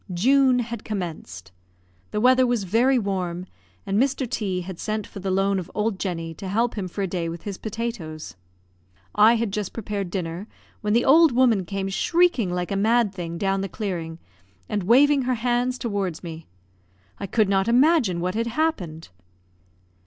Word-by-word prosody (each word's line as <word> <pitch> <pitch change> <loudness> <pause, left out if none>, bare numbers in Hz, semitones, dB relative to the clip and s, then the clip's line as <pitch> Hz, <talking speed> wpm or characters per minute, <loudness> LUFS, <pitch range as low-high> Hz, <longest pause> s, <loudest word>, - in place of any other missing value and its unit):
June 260 +6 +4
had 235 -2 -4
commenced; 155 - -6 0.6
the - - -2
weather 255 +2 +5
was 240 -4 0
very 235 +8 +3
warm, 185 -5 -2 0.4
and 200 +2 +1
Mr. 270 -1 0
T 195 -6 -2
had 180 -1 -8
sent 215 -1 -3
for 200 - -10
the 190 0 -3
loan 195 +1 +1
of 175 - -7
old 210 -2 -1
Jenny 165 -4 -3
to 190 +4 -8
help 230 +5 0
him 195 -4 -4
for 195 +3 -4
a - - 0
day 175 -2 -3
with 170 0 -7
his 200 -2 -6
potatoes. 220 -8 -5 0.8
I 215 +3 +6
had 225 -3 -2
just 210 -3 -3
prepared 205 -4 -4
dinner 175 +1 -4 0.3
when 210 0 0
the 235 +2 +3
old 315 0 +6
woman 235 -7 +3
came 195 +1 -3
shrieking 330 - +2
like 180 +1 -3
a - - 0
mad 220 +1 +2
thing 170 -3 -5
down 195 +1 0
the 195 - -3
clearing, 170 -5 -4 0.5
and 205 - -1
waving 275 +8 +5
her 255 0 0
hands 245 +2 0
towards 200 -9 -3
me. 165 -1 -8 0.7
I 200 - -4
could 215 +2 +2
not 195 0 +1
imagine 245 - +3
what 180 +1 -1
had 230 +2 -1
happened. 225 - -2
205 Hz, 175 wpm, -24 LUFS, 180-235 Hz, 0.8 s, I